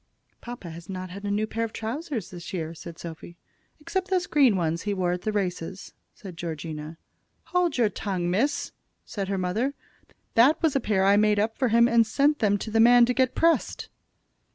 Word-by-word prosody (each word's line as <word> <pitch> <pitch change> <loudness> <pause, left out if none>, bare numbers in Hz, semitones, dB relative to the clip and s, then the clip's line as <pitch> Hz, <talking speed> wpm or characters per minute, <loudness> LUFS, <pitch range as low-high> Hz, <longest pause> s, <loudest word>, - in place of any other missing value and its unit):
"Papa 240 -8 -8
has 170 +2 -11
not 185 -1 -6
had 200 +2 -8
a - - -2
new 210 +2 0
pair 225 +1 -3
of 225 - -4
trousers 240 - -4
this 175 -2 -8
year," 165 -3 -3
said 170 0 -10
Sophy. 170 +1 -9 0.4
"Except 370 +5 -3
those 365 -2 +1
green 270 -8 +4
ones 165 -2 -1
he 205 -1 -2
wore 180 -2 0
at 180 0 -3
the 215 - -2
races," 185 -2 -4 0.2
said 190 -4 -10
Georgina. 160 -1 -6 0.6
"Hold 355 -5 +2
your 235 -3 +4
tongue, 190 -4 -3
miss!" 285 +9 0 0.3
said 200 -4 -4
her 195 0 -1
mother. 215 +10 -1 0.6
"That 260 +7 +5
was 315 -4 +2
a - - +4
pair 195 -6 +1
I 200 +1 +5
made 210 0 +3
up 220 +2 0
for 260 - +1
him 235 +1 +5
and 235 -2 +4
sent 290 +6 +2
them 205 -3 +2
to 220 - -6
the 225 - +2
man 240 +1 +7
to 250 - 0
get 260 0 +1
pressed." 330 0 +1
210 Hz, 200 wpm, -26 LUFS, 180-245 Hz, 0.6 s, man